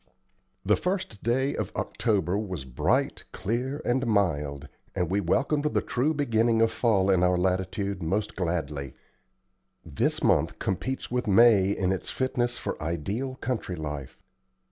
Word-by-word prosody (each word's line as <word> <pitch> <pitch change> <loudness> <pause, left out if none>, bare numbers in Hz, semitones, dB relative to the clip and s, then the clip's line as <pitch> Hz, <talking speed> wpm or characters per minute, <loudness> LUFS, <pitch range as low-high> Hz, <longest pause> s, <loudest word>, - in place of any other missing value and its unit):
The - - +4
1st 180 - -2
day 130 +4 +1
of - - -3
October 100 -6 0
was 95 -9 -3
bright, 65 -2 0
clear, 130 +8 -2
and 130 +1 +1
mild, 75 -9 0 0.3
and 90 -1 -1
we 100 +1 +2
welcomed 140 - +1
the - - +3
true 130 +6 0
beginning 115 -5 +2
of 115 0 +4
fall 100 -5 +2
in 95 -2 +3
our 90 0 +3
latitude 95 +2 -1
most 100 +6 -1
gladly. 75 -7 -3 0.9
This - - -1
month - - +2
competes 130 +9 -3
with 125 -1 -1
May 105 -2 +6
in 95 -2 0
its 95 - -2
fitness 120 -2 -1
for - - -5
ideal 100 - -3
country 120 -8 -3
life. 75 -4 -6
100 Hz, 145 wpm, -27 LUFS, 90-120 Hz, 0.9 s, May